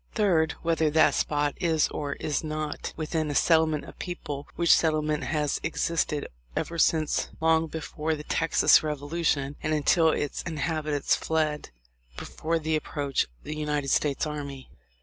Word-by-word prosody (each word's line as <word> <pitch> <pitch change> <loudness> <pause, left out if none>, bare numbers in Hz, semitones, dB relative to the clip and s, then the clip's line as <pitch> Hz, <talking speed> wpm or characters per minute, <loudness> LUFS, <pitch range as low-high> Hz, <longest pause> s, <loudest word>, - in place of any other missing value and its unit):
Third. 175 -7 +2
Whether 165 -2 +2
that 155 +1 +4
spot 145 -1 0
is 165 -4 +2
or 145 -1 -3
is 150 +2 -2
not 155 -1 -4
within 155 -1 -2
a 145 - -3
settlement 160 -2 +3
of - - -13
people, 150 -5 -5
which 170 -1 +5
settlement 155 -2 +1
has 150 -2 0
existed 165 -2 -1 0.3
ever 170 0 -3
since 155 -1 +2
long 160 0 +3
before 160 0 -3
the 150 - -8
Texas 165 +1 +4
revolution, 145 -1 -1
and 155 0 0
until 160 +2 +4
its 145 -2 -1
inhabitants 155 -2 -1
fled 155 -2 -1 0.5
before 165 +2 -2
the 160 0 -1
approach 145 -2 -1
of - - -28
the 155 - -5
United 150 -2 -2
States 145 +1 +1
army." 140 -3 -6
155 Hz, 150 wpm, -27 LUFS, 150-160 Hz, 0.5 s, which